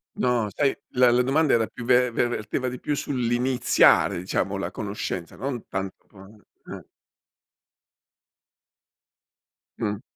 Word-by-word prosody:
No, 120 Hz, -3 st, +1 dB
sai, 140 Hz, +4 st, +1 dB
la 125 Hz, -1 st, +4 dB
la 120 Hz, +1 st, +3 dB
domanda 145 Hz, +4 st, +2 dB
era 115 Hz, -1 st, +2 dB
più 120 Hz, -, -9 dB
ve 125 Hz, 0 st, +4 dB
ver 120 Hz, -, +1 dB
verteva 120 Hz, +2 st, -3 dB
di 125 Hz, 0 st, -6 dB
più 150 Hz, -, -1 dB
sull'iniziare 125 Hz, -5 st, +2 dB
diciamo 95 Hz, +2 st, -2 dB
la 95 Hz, -, -3 dB
conoscenza, 100 Hz, -4 st, -5 dB
non 130 Hz, -4 st, -4 dB
tanto 95 Hz, -1 st, -5 dB, 0.6 s
eh. -, -, -8 dB, 3.0 s
Mh. 105 Hz, -2 st, -2 dB
120 Hz, 120 wpm, -25 LUFS, 105-125 Hz, 3.0 s, la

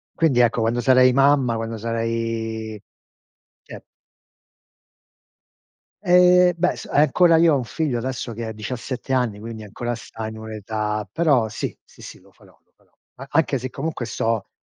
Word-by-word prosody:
Quindi, 145 Hz, -7 st, +2 dB
ecco, 120 Hz, 0 st, +2 dB
quando 115 Hz, +2 st, 0 dB
sarei 130 Hz, 0 st, +5 dB
mamma 135 Hz, -2 st, +3 dB
quando 115 Hz, 0 st, -4 dB
sarei, 115 Hz, -1 st, -3 dB, 0.8 s
cioè -, -, -11 dB, 2.2 s
Eh, 180 Hz, 0 st, +5 dB
beh, 180 Hz, +1 st, 0 dB
s -, -, -9 dB
ancora 160 Hz, +4 st, +4 dB
io 165 Hz, -2 st, +5 dB
ho -, -, +2 dB
un 130 Hz, -, -2 dB
figlio, 140 Hz, +1 st, -2 dB
adesso, 120 Hz, -1 st, -4 dB
che 115 Hz, +1 st, -5 dB
ha 110 Hz, -, -5 dB
17 125 Hz, +4 st, -5 dB
anni, 120 Hz, -5 st, 0 dB
quindi 110 Hz, 0 st, -8 dB
ancora 120 Hz, +4 st, -4 dB
sta 110 Hz, -1 st, -8 dB
in 110 Hz, 0 st, -8 dB
un'età, 110 Hz, -1 st, -4 dB
però, 140 Hz, -9 st, +2 dB
sì, 110 Hz, -, -5 dB
sì, -, -, -18 dB
sì, -, -, -10 dB
lo -, -, -23 dB
farò, -, -, -22 dB
lo -, -, -44 dB
farò. -, -, -33 dB, 0.2 s
A 135 Hz, -, -9 dB
anche 150 Hz, -4 st, +2 dB
se, 130 Hz, +1 st, -5 dB
comunque, 140 Hz, -3 st, -4 dB
sto 115 Hz, -2 st, -2 dB
120 Hz, 160 wpm, -22 LUFS, 110-140 Hz, 2.2 s, sarei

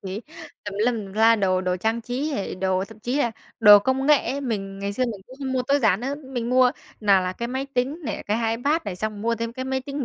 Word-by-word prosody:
thì 195 Hz, +3 st, -5 dB, 0.4 s
tùm 205 Hz, -1 st, -5 dB
lum 245 Hz, -, +2 dB
tùm 195 Hz, -, -11 dB
la 225 Hz, +1 st, +5 dB
đồ, 185 Hz, -3 st, +1 dB
đồ 180 Hz, -1 st, -1 dB
trang 220 Hz, +5 st, -1 dB
trí 250 Hz, +6 st, -3 dB
hề 205 Hz, -9 st, -3 dB
đồ, 190 Hz, 0 st, 0 dB
thậm 220 Hz, +1 st, -14 dB
chí 245 Hz, +5 st, -2 dB
là 235 Hz, -, +1 dB, 0.3 s
đồ 205 Hz, -1 st, +10 dB
công 260 Hz, +5 st, 0 dB
nghệ 300 Hz, -2 st, +4 dB
ấy, 280 Hz, -, -3 dB
mình 195 Hz, -7 st, -4 dB
ngày 200 Hz, 0 st, -3 dB
xưa 255 Hz, +5 st, 0 dB
mình 220 Hz, -5 st, -4 dB
cũng 260 Hz, -, -13 dB
không 265 Hz, -2 st, -3 dB
mua 255 Hz, -1 st, +1 dB
tối 280 Hz, +3 st, +2 dB
giản 220 Hz, -5 st, +2 dB
nữa, 270 Hz, +3 st, -2 dB
mình 260 Hz, -5 st, -5 dB
mua 255 Hz, 0 st, +5 dB, 0.3 s
nào 200 Hz, -3 st, +4 dB
là 185 Hz, 0 st, -2 dB
cái 235 Hz, +4 st, -5 dB
máy 265 Hz, +2 st, -3 dB
tính 260 Hz, +6 st, 0 dB
này, 220 Hz, -, -4 dB
cái 225 Hz, +2 st, 0 dB
iPad 300 Hz, +7 st, 0 dB
này, 180 Hz, -3 st, -4 dB
xong 215 Hz, 0 st, -4 dB
mua 230 Hz, +1 st, +1 dB
thêm 230 Hz, +1 st, -4 dB
cái 260 Hz, +1 st, -5 dB
máy 265 Hz, 0 st, -1 dB
tính 280 Hz, 0 st, -4 dB
230 Hz, 270 wpm, -24 LUFS, 200-260 Hz, 0.4 s, đồ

